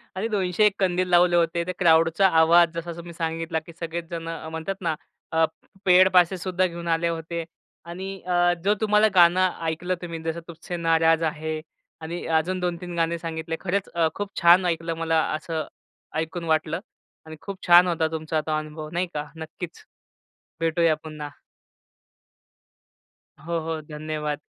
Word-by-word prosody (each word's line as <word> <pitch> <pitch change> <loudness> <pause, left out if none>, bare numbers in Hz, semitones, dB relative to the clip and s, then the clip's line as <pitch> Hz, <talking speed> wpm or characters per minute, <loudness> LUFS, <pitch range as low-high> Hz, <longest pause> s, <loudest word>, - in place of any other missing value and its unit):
आणि 195 +4 -1
201 200 0 +2
कंदील 185 -1 +1
लावले 175 0 +5
होते, 170 0 +2
ते 185 - -2
क्राउडचा 165 +2 +5
आवाज 170 0 +5
जसा 170 +1 -4
तुम्ही 170 0 -9
सांगितला 165 0 -2
की 170 - -12
सगळेच 170 0 -4
जण 165 -1 -5 0.2
म्हणतात 160 +4 -4
ना 165 -3 0 0.4
अ 160 0 +4 0.4
पेड 185 0 +7
पासेससुद्धा 180 +1 +3
घेऊन 170 -1 -7
आले 165 0 +1
होते 165 0 -3 0.4
आणि 175 +3 -6 0.2
अ 175 -1 +3
जो 205 +2 +4
तुम्हाला 210 0 +4
गाणं 180 +1 +6 0.2
ऐकलं 170 +3 -1
तुम्ही 170 -2 -5
जसं 165 +1 -3
तुझसे 170 +1 -7
नाराज 165 0 +3
आहे 155 0 -2 0.4
आणि 170 +2 -5
अजून 185 +4 -1
दोन 180 -1 -1
तीन 175 -1 -6
गाणे 165 0 +1
सांगितले 165 0 -4
खरंच 190 +1 -2
अ 170 -2 +2
खूप 205 -1 -4
छान 175 +2 +6
ऐकलं 165 -1 -1
मला 160 -1 +2
असं 160 0 -4 0.5
ऐकून 160 +2 -4
वाटलं. 160 +1 0 0.5
आणि 160 0 -9
खूप 200 -1 -6
छान 175 +1 +8
होता 165 -2 +1
तुमचा 155 0 -2
तो 155 - -2
अनुभव 155 0 -6
नाही 180 +2 0
का, 150 0 -4
नक्कीच, 160 +1 -8 0.8
भेटूया 165 0 +2
पुन्हा. 155 -2 -7 2.1
हो, 170 +1 -2
हो, 160 -1 -3
धन्यवाद. 150 -1 -3
170 Hz, 155 wpm, -25 LUFS, 160-180 Hz, 2.1 s, छान